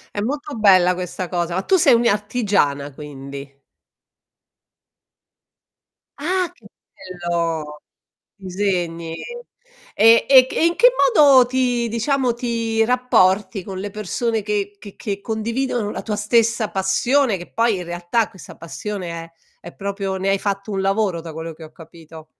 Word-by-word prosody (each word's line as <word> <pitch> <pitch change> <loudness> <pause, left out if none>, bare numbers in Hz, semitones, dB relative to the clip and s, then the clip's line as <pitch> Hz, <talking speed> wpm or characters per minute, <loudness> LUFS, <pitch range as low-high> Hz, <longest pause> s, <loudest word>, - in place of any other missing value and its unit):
È 205 - -1
molto 285 +5 -4
bella 185 -4 +5
questa 180 0 -5
cosa, 175 -1 -2
ma 190 - -1
tu 380 - +2
sei 315 -9 +5
un' 230 - +2
i 235 - +3
artigiana, 200 - 0
quindi? 140 -1 -10 2.6
Ah! 360 +4 -1
Che 225 -11 -18 0.5
bello! 165 -3 -3 0.6
Disegni! 180 -4 -3 0.8
E 225 +2 +5
e 260 -2 +8
che - - -8
e - - +3
in 340 - 0
che - - +7 0.3
modo 280 -7 +7
ti 245 -2 0
diciamo, 245 +2 0
ti 230 -2 -1
rapporti 210 -6 +2
con 190 -1 -7
le 205 +2 -5
persone 215 +2 -2
che 205 -1 -3
che 200 -1 -12
che 200 -3 -4
condividono 230 +1 -2
la - - -5
tua 210 -2 -3
stessa 225 +1 +1
passione? 225 +6 +1
Che 175 -1 -11
poi, 230 -2 +1
in 180 - -6
realtà, 175 +6 -1
questa 190 - -13
passione 185 +2 -6
è 165 0 -8 0.3
è 175 - -11
proprio 195 -1 -4
ne 195 +1 -1
hai 195 - +2
fatto 200 +1 -3
un 195 -2 -2
lavoro, 195 -2 0
da 165 -1 -9
quello 160 +1 -6
che 160 +1 -12
ho 155 - -14
capito. 160 -1 -14
200 Hz, 155 wpm, -20 LUFS, 175-235 Hz, 2.6 s, e